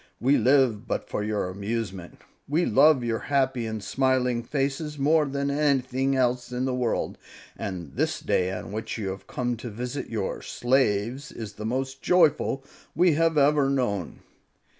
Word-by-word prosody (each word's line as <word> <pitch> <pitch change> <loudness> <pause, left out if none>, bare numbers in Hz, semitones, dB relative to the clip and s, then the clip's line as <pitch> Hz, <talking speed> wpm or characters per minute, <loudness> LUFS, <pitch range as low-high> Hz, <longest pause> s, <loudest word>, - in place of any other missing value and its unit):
We 135 +4 +3
live 125 -5 +3
but - - -2
for 105 - -3
your 105 -3 -1
amusement; 100 -1 -5 0.3
we 160 +5 +1
love 150 -5 +5
your 115 -1 -1
happy 130 -4 +1
and 110 -2 -5
smiling 130 -2 +1
faces 140 +4 -2
more 150 +2 +3
than 140 +1 -1
anything 135 -2 +1
else 125 -1 0
in 125 +1 -1
the 130 - -1
world, 125 -2 -1 0.4
and 85 -7 -6
this - - 0
day 90 0 0
on 95 - -6
which 110 +2 -4
you 100 -3 -3
have 95 0 -7
come 125 -1 -2
to 120 +2 -7
visit 125 +6 -5
your 105 -4 -3
slaves 120 0 0
is 110 -3 -7
the 105 +2 -5
most 130 +2 -3
joyful 160 -6 +3 0.3
we 175 -1 +4
have 165 +1 +2
ever 145 -1 +4
known." 120 -9 -1
125 Hz, 160 wpm, -26 LUFS, 110-140 Hz, 0.4 s, love